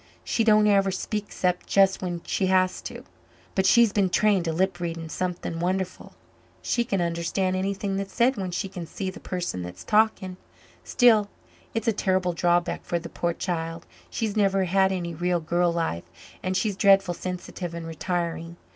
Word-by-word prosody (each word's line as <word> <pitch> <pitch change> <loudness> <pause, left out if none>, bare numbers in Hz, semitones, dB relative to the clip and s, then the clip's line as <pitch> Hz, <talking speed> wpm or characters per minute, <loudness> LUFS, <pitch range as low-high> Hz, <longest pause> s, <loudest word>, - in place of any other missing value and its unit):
She 230 - 0
don't 215 -1 +5
ever 200 -2 +4
speak 205 +2 -3
except 180 -3 -1
just 195 -1 +3
when 175 -2 -4
she 190 - 0
has 185 0 +2
to. - - -10 0.5
But 190 0 +2
she's 230 0 +5
been 195 -3 +2
trained 200 -2 +2
to 165 - 0
lip 185 +2 0
reading 165 -1 -4
something 180 -1 -3
wonderful 185 +1 -2 0.5
she 240 - +1
can 195 -5 -1
understand 170 +2 -1
anything 195 +1 -2
that's 195 0 -4
said 250 +5 +3
when 190 -4 -3
she 180 +3 -2
can 180 -3 -7
see 190 +3 -4
the - - -11
person 175 - -4
that's 90 +1 -8
talking. 210 -4 +1 0.5
Still, 220 -5 +4 0.5
it's 225 +1 -2
a 225 - +4
terrible 185 -3 +1
drawback 175 +1 +1
for 170 - -1
the 170 0 -7
poor 170 0 -1
child 165 -1 -4 0.2
she's 220 -2 -2
never 195 -2 +2
had 190 +1 +3
any 175 -3 -3
real 175 +2 0
girl 170 +2 +1
life 165 - -2 0.4
and 185 0 -1
she's 205 +1 0
dreadful 195 -2 +4
sensitive 180 -1 -6
and 170 -1 -6
retiring. 170 0 -3
185 Hz, 175 wpm, -25 LUFS, 170-195 Hz, 0.5 s, don't